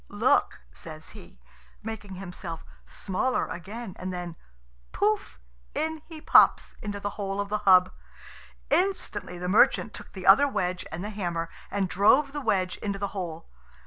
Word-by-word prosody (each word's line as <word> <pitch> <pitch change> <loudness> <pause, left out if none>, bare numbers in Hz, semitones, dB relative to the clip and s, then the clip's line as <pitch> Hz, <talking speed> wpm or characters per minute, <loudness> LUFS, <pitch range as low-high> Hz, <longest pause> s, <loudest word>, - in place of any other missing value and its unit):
"Look," - - +2
says - - -10
he, - - -14 0.4
making 210 -3 -6
himself 180 -3 -7 0.2
smaller 205 +7 -1
again; 200 +3 -7
and 185 0 -4
then, 175 -2 -5 0.6
pouf! 210 - 0 0.4
in 320 0 -2
he 320 -2 -9
pops 310 - +5
into 205 -1 -4
the 205 +1 -3
hole 195 0 -2
of 200 0 -2
the 210 0 0
hub. 185 -3 +6 0.8
Instantly 375 - 0
the 180 +1 -4
merchant 210 +3 +4
took - - -10
the 190 -1 -7
other 210 +9 +7
wedge 185 -8 -2
and 165 +3 -5
the 210 - -4
hammer, 170 -5 -3 0.2
and 200 -1 0
drove 255 +10 +4
the 290 - -3
wedge 195 -7 0
into 200 -2 -3
the 200 0 -3
hole. 175 -5 -6
195 Hz, 155 wpm, -27 LUFS, 180-215 Hz, 0.8 s, other